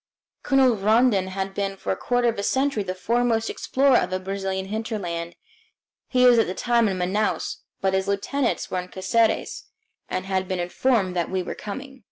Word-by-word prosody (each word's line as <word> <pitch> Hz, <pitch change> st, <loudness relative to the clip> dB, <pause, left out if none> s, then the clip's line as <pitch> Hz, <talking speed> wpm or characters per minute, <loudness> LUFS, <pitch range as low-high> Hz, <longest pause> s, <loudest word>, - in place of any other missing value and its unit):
Colonel 265 Hz, -3 st, +4 dB
Rondon 215 Hz, -1 st, +3 dB
has 190 Hz, +1 st, -3 dB
been 195 Hz, 0 st, -3 dB
for -, -, -3 dB
a -, -, +1 dB
quarter 245 Hz, +4 st, 0 dB
of 225 Hz, -3 st, 0 dB
a -, -, 0 dB
century 265 Hz, +1 st, +1 dB
the 185 Hz, -2 st, -4 dB
foremost 230 Hz, +3 st, 0 dB
explorer 270 Hz, -1 st, +2 dB
of -, -, 0 dB
the 185 Hz, 0 st, -2 dB
Brazilian 190 Hz, 0 st, -3 dB
hinterland. 190 Hz, -6 st, -4 dB, 0.7 s
He 250 Hz, -1 st, +3 dB
was 245 Hz, -2 st, +7 dB
at 225 Hz, -, +3 dB
the 185 Hz, -, -4 dB
time 235 Hz, -2 st, +2 dB
in 190 Hz, -, -2 dB
Manaos, 190 Hz, +4 st, -1 dB, 0.2 s
but 190 Hz, 0 st, +1 dB
his 190 Hz, 0 st, 0 dB
lieutenants 235 Hz, +6 st, -1 dB
were 185 Hz, -, 0 dB
in 180 Hz, -, -6 dB
Caceres 220 Hz, +5 st, 0 dB, 0.4 s
and 185 Hz, 0 st, -3 dB
had 190 Hz, -1 st, -1 dB
been 185 Hz, -, -2 dB
notified 185 Hz, +2 st, +1 dB
that 175 Hz, -2 st, -1 dB
we 185 Hz, -1 st, -1 dB
were -, -, -5 dB
coming. 265 Hz, +6 st, -8 dB
200 Hz, 190 wpm, -24 LUFS, 190-240 Hz, 0.7 s, was